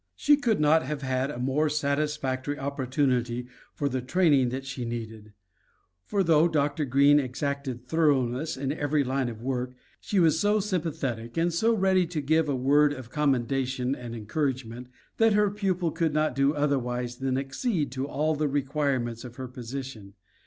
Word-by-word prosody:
She 295 - +4
could 240 - 0
not 155 +2 +4
have 150 -3 -5
had 130 +1 0
a 145 - -6
more 135 +5 +1
satisfactory 145 -2 -1
opportunity 130 -3 -1 0.3
for 145 - -1
the 130 -1 -2
training 140 -2 +3
that 130 +2 -5
she 130 -1 -5
needed; 110 -2 -6 0.7
for 200 -1 +1
though 165 -1 +4
Dr. 150 -1 0
Greene 140 +3 +5
exacted 135 -1 -3
thoroughness 145 -2 +1
in 135 0 -2
every 145 0 0
line 130 -1 -1
of 115 -1 -9
work, 125 -1 -2 0.2
she 200 - -1
was 160 -2 +4
so 205 +2 +3
sympathetic 150 - -3
and 170 +1 +1
so 225 +7 +2
ready 190 -3 +2
to 165 -2 -3
give 155 +2 +1
a 140 - +1
word 145 +3 +3
of 130 -4 -10
commendation 130 -2 0
and 120 -3 -7
encouragement, 125 +1 -3 0.3
that 225 -1 +4
her 210 -1 +3
pupil 185 -5 -1
could 160 -2 -1
not 155 -2 +1
do 140 +3 +2
otherwise 125 -4 -1
than 130 -1 0
accede 145 - -2
to 130 +1 -3
all 155 +2 0
the 150 0 0
requirements 135 -4 -1
of 120 -2 -10
her 130 0 -6
position. 125 -4 -8
140 Hz, 165 wpm, -27 LUFS, 125-155 Hz, 0.7 s, Greene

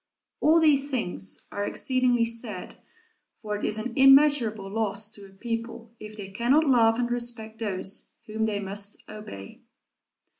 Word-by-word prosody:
All 320 +2 +5
these 290 -3 +3
things 180 - -3
are 205 - -3
exceedingly 250 +1 +1
sad, 230 -1 -5 0.6
for 210 -2 -4
it 205 - -6
is 215 - 0
an 230 +2 -4
immeasurable 270 -7 +5
loss 210 0 -2
to 200 -1 -9
a - - -18
people 230 +3 -6
if 215 0 -10
they 195 -2 -7
cannot 245 +10 +2
love 230 -5 +4
and 240 -1 -1
respect 235 -2 -4
those 195 -3 -3 0.2
whom 220 +1 -2
they 205 -2 -2
must 200 +1 -4
obey. 155 - -10
225 Hz, 150 wpm, -26 LUFS, 205-245 Hz, 0.6 s, All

